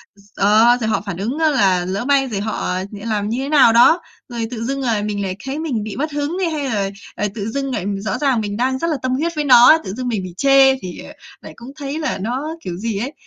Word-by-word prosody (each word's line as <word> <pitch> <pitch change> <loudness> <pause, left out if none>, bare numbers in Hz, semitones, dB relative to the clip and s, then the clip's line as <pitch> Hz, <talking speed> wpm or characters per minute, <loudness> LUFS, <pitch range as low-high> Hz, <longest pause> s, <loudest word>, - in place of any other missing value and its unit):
D 200 0 -21
đó, 220 +4 +5
rồi 220 - 0
họ 220 - 0
phản 185 -4 -5
ứng 235 +10 -3
á 315 -1 +3
là 190 -10 +2
lỡ 195 +6 -3
may 275 -1 +2
rồi 205 -4 -3
họ 220 +1 -3 0.3
lại 205 +2 -9
làm 210 -2 -1
như 235 - -2
thế 280 - -4
nào 265 -7 +5
đó, 315 +9 +5 0.3
rồi 230 -2 -3
tự 230 -2 -5
dưng, 275 +1 -2
ờ, 225 -5 0
mình 205 -1 -3
lại 185 -1 -3
thấy 275 +3 -4
mình 260 -10 -2
bị 215 - -6
mất 305 +3 -3
hứng 295 +4 -3
đi 370 - +1
hay 290 -4 -3
là, 200 -3 -1 0.3
ờ, 210 - -1
tự 210 0 -4
dưng 275 +2 -3
lại 200 -5 -3
rõ 200 -1 -3
ràng 265 -6 +1
mình 205 0 -4
đang 260 +2 0
rất 335 - -1
là 305 - -1
tâm 255 0 -2
huyết 330 +5 -1
với 300 -1 -1
nó 245 -3 +8
ấy, 315 - +8
tự 190 - -6
dưng 250 +2 -4
mình 215 -6 -2
bị 180 -2 -8
chê 275 0 +5
thì, 180 -2 -8
ờ, 295 - -10 0.3
lại - - -11
cũng 240 +3 -11
thấy 290 +1 -5
là 305 - -2
nó 260 +10 -4
kiểu 175 -1 -6
gì 220 0 -3
ấy. 265 +6 -4
240 Hz, 280 wpm, -19 LUFS, 205-275 Hz, 0.3 s, nó